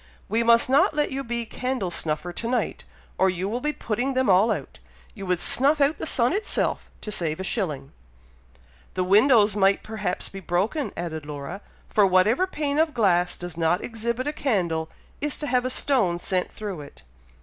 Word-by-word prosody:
We 225 +3 +1
must 235 0 +5
not 275 +3 +3
let 295 -1 +1
you 270 +1 -3
be 235 -1 -3
candle 250 -6 -3
snuffer 165 +2 -2
to 230 - -4
night, 250 +1 -2 0.3
or 190 - +4
you 185 +1 -2
will 235 +4 -3
be 300 - 0
putting 250 +1 -2
them 260 -6 +3
all 195 +5 +5
out. - - -5 0.3
You 195 -4 -8
would 180 -1 +1
snuff 285 - +4
out 285 +2 +2
the - - -3
sun 245 0 +2
itself, 415 +2 -1
to 210 - -6
save 165 -5 -2
a - - -3
shilling." 155 - -2 1.0
"The 185 - +1
windows 210 +2 +5
might 195 -1 +3
perhaps 210 -4 -3
be 195 - -8
broken," 195 - -1
added 160 -3 -4
Laura; 150 +6 -6 0.3
"for 205 -2 +3
whatever 205 - +3
pane 295 -4 -2
of 315 -3 +1
glass 180 -6 +2
does 175 -2 -7
not 170 +2 +1
exhibit 235 +2 -3
a 295 - -2
candle, 175 - -1 0.3
is 295 -1 -2
to 300 - -4
have 250 -2 +1
a - - 0
stone 245 -10 +1
sent 180 +1 -2
through 200 -7 -6
it. 140 - -13
210 Hz, 190 wpm, -25 LUFS, 180-255 Hz, 1.0 s, must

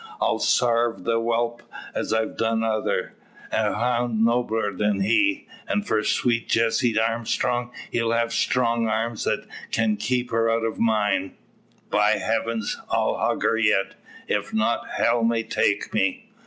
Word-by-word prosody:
I'll - - +1
sarve 120 -1 +2
the 115 -1 +1
whelp 120 +1 -1 0.3
as - - -3
I've 110 0 0
done 115 0 0
'tother, 110 -1 -1 0.4
a - - +1
hound 120 -1 +1
nobler 115 -3 0
than 105 -2 0
he. 305 - +2 0.2
An' 205 - 0
for 110 - 0
sweet 120 0 0
Jessie 115 0 +2
Armstrong, 120 +2 0 0.2
he'll 115 -1 0
have 115 0 0
strong 115 -2 +1
arms 110 +1 -1
that - - -1 0.2
can 110 -2 +1
keep 125 +4 -1
her 115 0 +2
out 115 0 +1
o' 115 - -1
mine. 105 -4 +1 0.5
By 105 +1 +4
heavens! 115 0 -2
I'll - - +1
hug - - -1
her - - +2
yet. 105 -3 +2 0.3
If - - -2
not, 110 +2 0
hell 115 0 +1
may 115 0 +1
take 100 - 0
me!" 230 0 -1
115 Hz, 150 wpm, -24 LUFS, 110-120 Hz, 0.5 s, By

